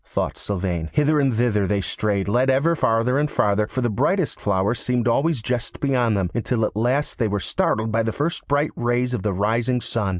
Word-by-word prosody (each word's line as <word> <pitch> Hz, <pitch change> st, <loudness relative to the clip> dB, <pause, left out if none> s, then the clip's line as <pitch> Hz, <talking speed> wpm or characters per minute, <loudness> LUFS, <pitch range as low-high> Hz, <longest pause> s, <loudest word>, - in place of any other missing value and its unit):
thought -, -, -3 dB
Sylvain. 90 Hz, -5 st, -3 dB
Hither 150 Hz, +1 st, +3 dB
and 135 Hz, -2 st, +2 dB
thither 110 Hz, -4 st, +1 dB
they 100 Hz, 0 st, +1 dB
strayed, 100 Hz, 0 st, -1 dB
led 125 Hz, +6 st, +2 dB
ever 140 Hz, +6 st, +3 dB
farther 125 Hz, 0 st, +1 dB
and 150 Hz, 0 st, 0 dB
farther, 105 Hz, -2 st, +1 dB
for 130 Hz, -, -3 dB
the 120 Hz, -, +1 dB
brightest 180 Hz, -, 0 dB
flowers 100 Hz, +3 st, 0 dB
seemed 125 Hz, -1 st, 0 dB
always 135 Hz, +1 st, +1 dB
just 120 Hz, 0 st, -3 dB
beyond 125 Hz, -6 st, +1 dB
them, 95 Hz, -2 st, -1 dB
until 120 Hz, -1 st, 0 dB
at -, -, -4 dB
last 125 Hz, +7 st, 0 dB
they 115 Hz, -, +2 dB
were 100 Hz, 0 st, -1 dB
startled 110 Hz, +3 st, -1 dB
by 115 Hz, +1 st, +2 dB
the 110 Hz, 0 st, -1 dB
first 155 Hz, +8 st, -3 dB
bright 145 Hz, +1 st, +1 dB
rays 120 Hz, +1 st, 0 dB
of 120 Hz, -, -2 dB
the 105 Hz, -, -1 dB
rising 115 Hz, +6 st, 0 dB
sun. 115 Hz, -4 st, -2 dB
120 Hz, 210 wpm, -22 LUFS, 105-130 Hz, -, Hither